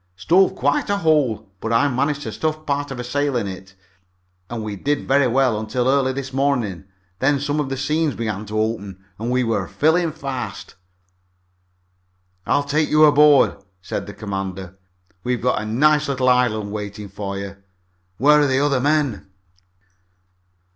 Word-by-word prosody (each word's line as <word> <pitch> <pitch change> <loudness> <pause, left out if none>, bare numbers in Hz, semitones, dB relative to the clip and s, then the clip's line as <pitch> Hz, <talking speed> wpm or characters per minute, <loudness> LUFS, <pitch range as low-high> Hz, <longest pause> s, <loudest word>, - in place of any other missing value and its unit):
"Stove 175 - +3
quite 145 +7 0
a 200 - +1
hole, 150 - +1
but 115 - -4
I 115 +5 +3
managed 140 +2 -1
to - - -5
stuff 155 0 -3
part 145 0 -1
of 135 -2 -6
a - - -3
sail 140 +2 -1
in 115 - -1
it, 95 0 -8 0.7
and 115 -2 -4
we 105 -1 -4
did 145 +8 -2
very 135 0 +4
well 125 -3 +2
until 120 +3 -2
early 135 -1 +2
this 135 0 -6
morning. 125 -10 -1 0.3
Then 140 +1 +2
some 145 +2 -1
of 145 -3 -1
the 135 - -3
seams 150 +1 0
began 110 -2 -4
to 110 +1 -2
open, 100 -4 -3
and 115 +2 -3
we're 125 -2 0
filling 160 +2 +1
fast." 130 - -6 1.7
"I'll 145 - +2
take 150 +2 0
you 155 0 +6
aboard," 150 -1 +5 0.3
said - - -4
the 105 - -8
commander. 95 -3 -5 0.5
"We've 125 -1 -1
got 125 -3 0
a 110 - -5
nice 150 +6 +3
little 130 -2 +1
island 115 -5 +1
waiting 105 0 -6
for 100 0 -5
you. 100 0 -7 0.6
Where 150 +5 +5
are 145 - +3
the 130 -1 +1
other 140 -2 +2
men?" 145 -5 0
130 Hz, 165 wpm, -21 LUFS, 110-145 Hz, 1.7 s, you